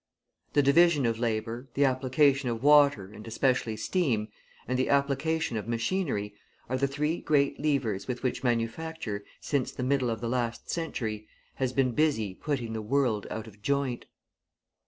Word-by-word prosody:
The 145 - +4
division 145 0 +5
of 115 -1 0
labour, 115 +2 -2
the 140 - +4
application 135 +1 +2
of 115 +1 -3
water 140 -9 +5
and 110 +1 -11
especially 115 -1 0
steam, 110 - 0 0.4
and 125 0 0
the 130 - +1
application 140 -1 +1
of 105 - -5
machinery, 115 - -1 0.3
are 130 - -1
the 140 - +2
three 150 +4 -1
great 140 -2 +2
levers 130 -10 0
with 125 -1 -4
which 130 +1 -1
manufacture, 120 -1 -2 0.2
since 140 -4 -1
the 125 - -5
middle 130 -1 +1
of 115 -1 -2
the 115 - -3
last 120 -1 -2
century, 110 -10 -3 0.3
has 130 -2 0
been 130 -1 +2
busy 120 -8 +1
putting 125 -1 -3
the 110 - -3
world 115 -2 0
out 110 - -5
of 105 -2 -15
joint. 140 -1 -1
130 Hz, 160 wpm, -28 LUFS, 115-140 Hz, 0.4 s, division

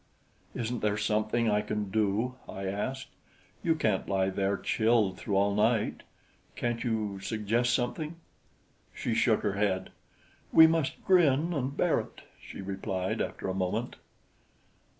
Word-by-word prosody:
"Isn't 120 0 -2
there 105 0 +1
something 110 +2 +1
I 105 -1 +2
can 105 -1 -3
do?" 110 +4 +1 0.2
I 95 0 -5
asked. 115 +8 -3 0.5
"You 165 -2 +2
can't 110 -11 0
lie 95 -1 +1
there 100 +1 0
chilled 110 -4 +1
through 100 - -2
all 100 +1 +3
night. 105 +1 +1 0.5
Can't 120 -1 -2
you 110 -5 -2
suggest 115 +4 0
something?" 145 +6 -1 0.8
She - - -2
shook - - +3
her 100 - 0
head. 100 -2 -1 0.6
"We 160 - +9
must 160 -3 0
grin 170 -3 +4
and 140 -2 -2
bear - - +3
it," - - -9 0.2
she - - -9
replied 95 -1 -2
after - - -4
a 95 - -1
moment. 95 +6 -2
110 Hz, 140 wpm, -29 LUFS, 100-125 Hz, 0.8 s, We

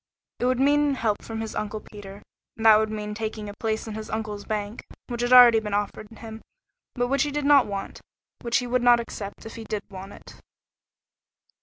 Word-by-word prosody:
It - - 0
would 255 0 +1
mean 290 +1 +3
help 220 -5 -1
from 225 -1 -6
his 220 -1 -5
Uncle 215 0 -4
Peter, 205 -1 -12 0.3
and 225 - -5
that 220 -1 +9
would 220 0 0
mean 210 -1 -5
taking 215 0 -5
a 205 - -7
place 220 -1 -2
in 220 - -5
his 215 0 -7
uncle's 210 -2 -4
bank, 210 0 -4 0.2
which 240 -1 -5
had 245 +1 -1
already 245 -3 +9
been 210 -2 -3
offered 205 +1 -3
him, 225 -1 -10 0.5
but 245 -1 0
which 275 +2 +1
he 295 - +1
did 290 0 -3
not 285 -4 +5
want, 200 -1 -6 0.4
which 235 0 +1
he 250 - -2
would 250 0 0
not 240 -1 +5
accept 205 -3 -7
if 225 - -9
he 225 - -7
did 215 -2 -4
want 195 +1 -9
it. - - -14
220 Hz, 210 wpm, -25 LUFS, 210-245 Hz, 0.5 s, that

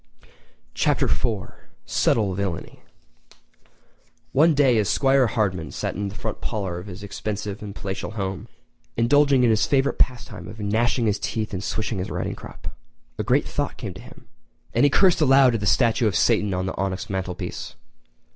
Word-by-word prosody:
Chapter - - +2
IV: 105 -5 -1 0.3
Subtle 105 -4 +1
Villainy[edit] 95 -3 -4 1.5
One 155 +3 +4
day 130 -5 +4
as 100 -4 +1
'Squire 135 -2 +3
Hardman 95 -8 -1
sat - - -3
in 100 0 -3
the 100 - -10
front 110 -1 -5
parlour 95 -6 -3
of 90 - -10
his 100 +1 -9
expensive 100 0 -5
and 105 -1 -7
palatial 95 -1 -4
home, 95 0 -4 0.5
indulging 135 +2 +4
in 120 - +5
his 110 -1 +2
favourite 140 -1 +1
pastime 120 -7 -1
of 110 +1 -10
gnashing 115 +4 +1
his 105 -1 +1
teeth 110 -2 -3
and 95 0 -3
swishing 110 -1 -2
his 90 - -3
riding - - -3
crop, - - -9 0.4
a - - 0
great - - +2
thought - - -3
came - - -6
to - - -11
him; - - -15 0.5
and - - +4
he - - +5
cursed 180 +3 +4
aloud 135 -3 +6
at 115 - 0
the 105 - -2
statue 115 0 +3
of 100 - -1
Satan 105 -3 +3
on 90 0 -1
the 95 - -3
onyx 95 0 -2
mantelpiece. 95 -2 -5
105 Hz, 175 wpm, -24 LUFS, 95-120 Hz, 1.5 s, aloud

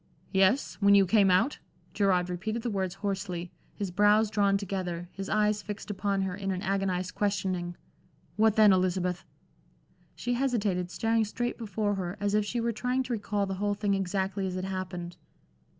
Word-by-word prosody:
"Yes 195 +7 +2
when 200 0 +6
you 200 -1 +6
came 200 0 +4
out?" 185 +11 +2 0.3
Gerard 185 -3 +2
repeated 215 +6 -3
the 240 - -1
words 190 -2 -2
hoarsely, 185 -3 -3 0.2
his 200 -4 -3
brows 210 +3 +4
drawn 200 -2 +3
together, 180 -3 -4
his 195 0 -6
eyes 210 0 +2
fixed 210 0 -6
upon 195 -1 -1
her 185 -1 -2
in 195 -1 -4
an 185 0 -2
agonized 190 -2 -1
questioning. 190 -4 -1 0.6
"What 220 +1 +3
then, 215 -2 +7
Elizabeth?" 180 -1 0 0.9
She 245 - -2
hesitated, 210 -9 0
staring 225 +4 +1
straight 240 +4 -3
before 215 -2 -1
her, 185 0 -4
as 205 0 0
if 210 0 +3
she 240 +3 -2
were 235 0 0
trying 250 +4 -1
to 255 - -3
recall 205 -2 -1
the 195 - -3
whole 205 0 +1
thing 205 -1 0
exactly 195 0 -1
as 185 - -4
it 185 0 -3
happened. 185 -2 -5
200 Hz, 175 wpm, -29 LUFS, 185-210 Hz, 0.9 s, then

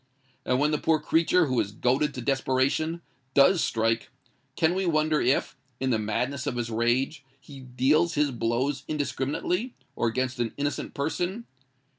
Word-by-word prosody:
And 125 - +2
when 150 +2 +2
the 150 - 0
poor 160 -1 +2
creature 165 +3 +3
who 130 -4 0
is 100 -2 -1
goaded 130 +7 0
to 125 - -4
desperation, 135 +5 0 0.3
does 160 +5 +5
strike—can 115 +8 -2
we 190 0 -1
wonder 155 -1 +2
if, 130 +3 +1 0.2
in 130 0 0
the 110 - +2
madness 125 +6 -2
of - - -1
his 120 -1 -3
rage, 120 +6 0 0.2
he 140 0 -12
deals 135 +7 +1
his 145 -1 +2
blows 120 +4 -1
indiscriminately, 155 - -2 0.2
or 120 - 0
against 130 +2 -2
an 120 -2 -2
innocent 145 0 -3
person? 180 +9 -2
135 Hz, 155 wpm, -27 LUFS, 125-155 Hz, 0.3 s, does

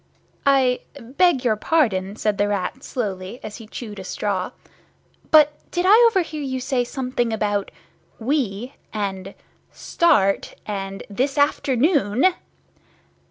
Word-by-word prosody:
"I 260 -2 +4 0.2
beg 265 +3 +1
your 220 -3 +3
pardon," 210 -7 +1
said 210 -2 -1
the 205 - +3
Rat 205 +6 -2
slowly, 200 -2 -4
as 215 - -7
he 225 -3 -11
chewed 210 -2 -8
a - - -7
straw, 190 -1 -2 0.8
"but 300 -1 +6 0.2
did 350 +1 -1
I 395 - +7 0.2
overhear 340 -8 -1
you 260 -2 -3
say 255 -1 0
something 250 -2 -2
about 205 -2 -1 0.5
'we,' 245 -2 -2 0.2
and 195 -2 -4 0.4
'start,' 220 - +1
and 195 -1 -5
'_this 270 +7 -1
afternoon? 285 - +2
240 Hz, 120 wpm, -22 LUFS, 205-280 Hz, 0.8 s, I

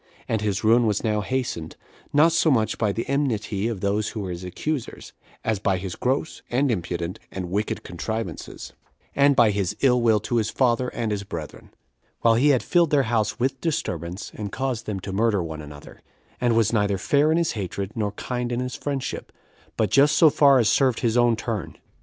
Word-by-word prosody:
And 110 -2 -1
his 105 -1 -1
ruin 115 +2 +4
was 105 -1 0
now 105 -2 +1
hastened, 120 -10 -3 0.4
not 155 +3 +5
so 165 0 +3
much 115 -6 +1
by 105 -3 +2
the 115 +3 -4
enmity 115 -7 -1
of 110 -5 -4
those 100 +1 0
that 110 - -4
were 95 -3 -4
his 90 +1 -6
accusers, 125 - -5 0.3
as 110 -3 0
by 95 -2 +1
his 90 -1 -5
gross, 135 +5 -2
and 130 +2 +1
impudent, 85 -3 -3
and 90 -2 -5
wicked 105 +3 -2
contrivances, 95 0 -5 0.4
and 140 0 +4
by 115 -4 +5
his 100 0 -1
ill 125 -3 +4
will 110 -2 +4
to 120 +3 -1
his 110 -2 +1
father 125 -1 +1
and 115 -3 -3
his 100 -1 -2
brethren; 85 -6 -8 0.5
while 115 - +5
he 125 +6 +3
had 130 -4 +3
filled 170 -2 +3
their 145 -2 +3
house 110 +1 0
with 130 +1 -1
disturbance, 105 - -3
and 105 -2 -6
caused 130 -4 -3
them 105 -3 -3
to 95 - -6
murder 105 -2 +1
one 80 -1 -6
another; 75 -1 -12 0.4
and 120 -2 +2
was 115 0 +2
neither 100 -3 +1
fair 150 - +2
in 160 - +3
his 170 -1 +1
hatred, 100 -1 -4
nor 105 -2 -2
kind 125 -1 -4
in 120 - -1
his 125 0 -3
friendship, 140 -3 -4 0.5
but 105 -4 +1
just 145 +2 +5
so 160 -3 +7
far 140 -2 +5
as 120 -4 +3
served 130 -1 +2
his 115 -1 +1
own 120 -1 +4
turn. 110 -4 -4
115 Hz, 200 wpm, -24 LUFS, 100-130 Hz, 0.5 s, so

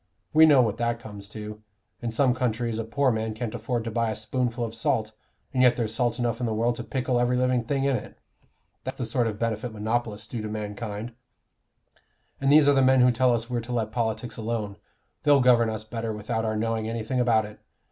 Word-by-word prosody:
We 160 +1 +8
know 140 -4 +6
what 110 -2 -1
that 120 0 -1
comes 105 -3 -9
to: 105 -1 -7 0.4
in 120 - -2
some 125 +3 +3
countries 120 -2 -1
a - - -1
poor 130 +4 +1
man 110 -1 -2
can't 110 -1 -4
afford 120 -3 -2
to 115 - -4
buy 115 0 0
a 110 - -2
spoonful 120 +2 -1
of 110 - -6
salt, 115 -1 0 0.4
and 130 - +2
yet 125 -1 +6
there's 110 -3 -2
salt 120 0 0
enough 120 -1 -1
in 125 - -1
the 110 - -1
world 120 +2 +1
to 120 - -4
pickle 125 0 -1
every 120 +1 +2
living 125 -1 +2
thing 135 +3 -1
in 140 -1 +2
it. 110 - -6 0.7
That's - - -5
the - - -2
sort 120 -3 0
of 105 -2 -3
benefit 115 +1 -2
monopolists 110 0 -2
do 120 - -5
to 110 - -4
mankind. 105 +1 -5 1.3
And 135 0 +2
these 150 -1 +7
are 145 - +6
the 135 - +4
men 130 0 +5
who 125 0 +6
tell 125 +1 +3
us 115 -1 0
we're 120 -1 -1
to 120 +2 -8
let 110 -3 -1
politics 115 +1 -2
alone; 110 -3 -3 0.4
they'll 145 -1 +5
govern 120 -3 +4
us 110 -1 -4
better 115 0 -4
without 110 +1 -3
our 110 0 -1
knowing 110 0 -1
anything 115 +3 -2
about 115 -3 +3
it. 105 0 -12
115 Hz, 225 wpm, -26 LUFS, 110-125 Hz, 1.3 s, We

